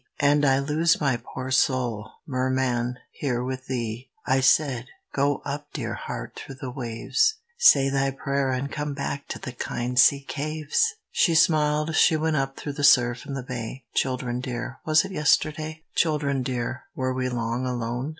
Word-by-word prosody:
And 145 +1 +4
I 135 0 +4
lose 155 +4 +2
my 135 -5 0
poor 130 +1 -6
soul, 125 -5 +1 0.2
Merman, 130 -2 0
here 125 -4 -2
with 130 +1 -5
thee." 120 -1 -4 0.2
I 135 -1 +3
said: 130 -2 +3 0.3
"Go 140 +1 +1
up, 145 +1 -4
dear - - -3
heart, - - -6
through 135 - -8
the 130 -1 -6
waves: 130 - 0 0.2
Say 140 - +7
thy 135 0 +1
prayer, 140 0 -1
and 130 +2 -2
come 150 -1 -3
back 140 0 -4
to - - -5
the 125 - -6
kind 125 0 -2
sea 140 +3 +6
caves!" 155 - 0 0.2
She 170 -4 +3
smiled, 155 -1 +3
she 160 -1 +5
went 160 0 0
up 135 0 -2
through 145 - -5
the 145 - -4
surf 120 -3 +4
in 140 - -4
the 135 - -4
bay. 125 0 -6
Children 125 -2 -1
dear, 125 +1 -5
was 155 +3 +4
it 195 - -7
yesterday? 155 -1 +1
Children 145 -4 +1
dear, 125 0 -3
were 130 0 -1
we 130 0 -1
long 120 +1 -2
alone? 125 +2 -2
135 Hz, 170 wpm, -25 LUFS, 125-150 Hz, 0.3 s, Say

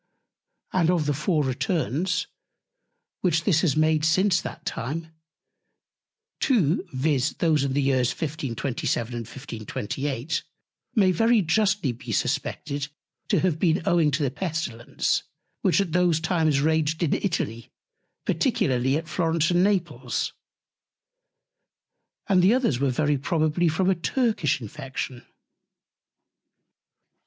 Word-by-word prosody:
And 175 -3 +3
of 175 -4 +2
the 145 - +1
four 150 +2 +1
Returns, 170 - -1 0.9
which 170 -3 +1
this 170 -5 +3
has 155 -5 +1
made 155 0 +3
since 180 +2 +3
that - - -8
Time; 160 +7 -4 1.3
two, 195 - +2
viz. 140 0 +1
those 155 -4 +2
in 135 -1 -1
the 140 0 +1
Years 130 -2 +2
1527, 135 -6 -2
and 115 -2 -5
1528, 135 +4 -4 0.5
may 195 -4 +5
very 225 +3 +3
justly 195 - +2
be 120 +4 -8
suspected 140 +1 -2 0.4
to - - +2
have 175 -4 +1
been 170 0 +2
owing 170 -3 +3
to 145 +1 0
the 135 - 0
Pestilence, 150 -6 -2 0.4
which 180 -2 +3
at 195 -4 0
those 175 -2 +3
Times 160 -3 +1
raged 160 +1 +1
in 160 - +1
Italy, 115 - -2 0.6
particularly 130 +2 +1
at 160 0 -5
Florence 165 0 +1
and 175 +1 +3
Naples. 170 -11 -1 1.9
And 190 -3 +4
the 195 +7 +5
others 235 - +1
were 140 0 +2
very 145 +2 +1
probably 155 +3 +1
from 165 +4 +1
a 190 - +5
Turkish 185 - 0
Infection. 130 +1 -6
155 Hz, 120 wpm, -25 LUFS, 135-180 Hz, 1.9 s, may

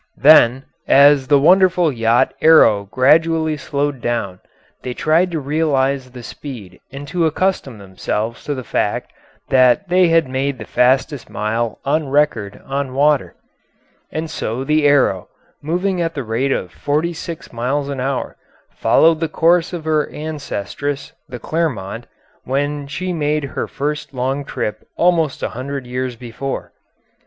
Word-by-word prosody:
Then, 135 -3 +6 0.2
as 140 -1 +5
the 145 +1 +5
wonderful 180 +2 +4
yacht 115 -1 +2
Arrow 115 -11 +5
gradually 160 +5 +3
slowed 145 -2 -3
down, 100 -7 -2 0.4
they 125 -1 -5
tried 165 +4 +2
to 165 -2 -3
realise 140 -3 0
the 125 -1 -11
speed 110 -10 -9
and 140 +1 -8
to 175 -2 +1
accustom 160 - -1
themselves 105 +4 -4
to 145 - -2
the 130 - -6
fact - - -2 0.4
that 130 +8 +4
they 180 0 +4
had 165 -3 +3
made 135 +1 -2
the 110 - -8
fastest 130 +1 +1
mile 110 +2 -2
on 150 +1 0
record 135 -8 0
on 135 -1 -3
water. 140 - +2 0.8
And 160 +1 -3
so 130 -4 -4
the 150 +1 +2
Arrow, 130 -10 +2 0.3
moving 180 +4 -1
at 165 -1 -2
the 140 - -3
rate 120 +5 -1
of 90 -8 -2
forty 155 +4 -1
six 165 -2 -8
miles 135 +5 -1
an 140 -2 -4
hour, 130 0 -3 0.3
followed 165 -1 +3
the 165 -1 -1
course 170 +2 +2
of 170 -3 -6
her 155 -1 +1
ancestress, 145 -2 -5 0.2
the 125 - -6
Clermont, 120 - -3 0.4
when 145 +2 -2
she 180 +5 -4
made 150 -2 -1
her 140 - -4
first 150 0 -4
long 135 +3 -2
trip 105 - -4 0.2
almost 165 -5 +1
a - - -1
hundred 135 +2 -6
years 125 0 -4
before. 120 +3 -6
140 Hz, 145 wpm, -18 LUFS, 125-155 Hz, 0.8 s, Then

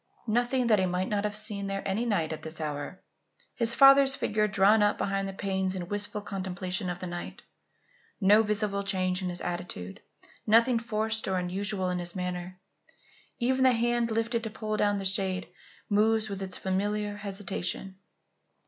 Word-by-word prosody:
Nothing 245 +3 +1
that 215 -3 +4
he 185 - +2
might 180 +1 -1
not 205 0 0
have 210 0 -1
seen 210 -2 0
there 195 0 -3
any 205 +5 -1
night 165 -8 0
at 155 - -7
this 160 +1 -6
hour. 150 +3 -5 0.5
His 235 -1 0
father's 275 0 +7
figure 215 -3 0
drawn 205 +2 +4
up 205 0 +3
behind 195 0 -1
the - - -4
panes 190 -1 -2
in 175 -1 -5
wistful 205 0 -2
contemplation 185 -1 -3
of 180 - -3
the 185 - -6
night. 175 -1 -7 0.8
No 205 +2 +6
visible 210 -2 0
change 185 -1 0
in 185 - -2
his 175 0 -4
attitude, 175 - -5 0.5
nothing 230 +2 +5
forced 220 -1 -2
or 190 -1 0
unusual 185 +1 -1
in 180 - -2
his 175 +1 -3
manner. 180 0 -4 0.8
Even 260 +2 +1
the 260 -1 +6
hand, 240 0 +1
lifted 230 +1 -1
to 220 - -3
pull 215 0 -4
down 205 -1 +1
the 195 - -4
shade, 190 -1 0 0.4
moves 215 +1 +2
with 195 -1 -5
its 190 -1 -3
familiar 205 +2 -2
hesitation. 195 -2 -4
200 Hz, 175 wpm, -28 LUFS, 185-220 Hz, 0.8 s, father's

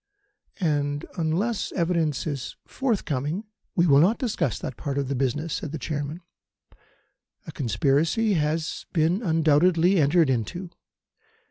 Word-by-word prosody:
And 145 -4 0
unless 180 +7 -1
evidence 165 -5 0
is 140 -5 -4
forthcoming 180 - -2 0.2
" - - -50
"We 170 - +4
will 140 -4 +6
not 190 +9 +4
discuss 190 - -1
that 130 - -6
part 140 +5 -4
of 140 -2 -1
the 140 - -1
business," 140 +5 -1
said 160 -8 -4
the - - -2
Chairman. 150 +3 -4 1.2
"A - - -7
conspiracy 145 - +1
has 155 -1 -1
been 170 +5 +2
undoubtedly 165 +1 +3
entered 150 0 +4
into. 170 - -3
160 Hz, 130 wpm, -25 LUFS, 145-180 Hz, 1.2 s, will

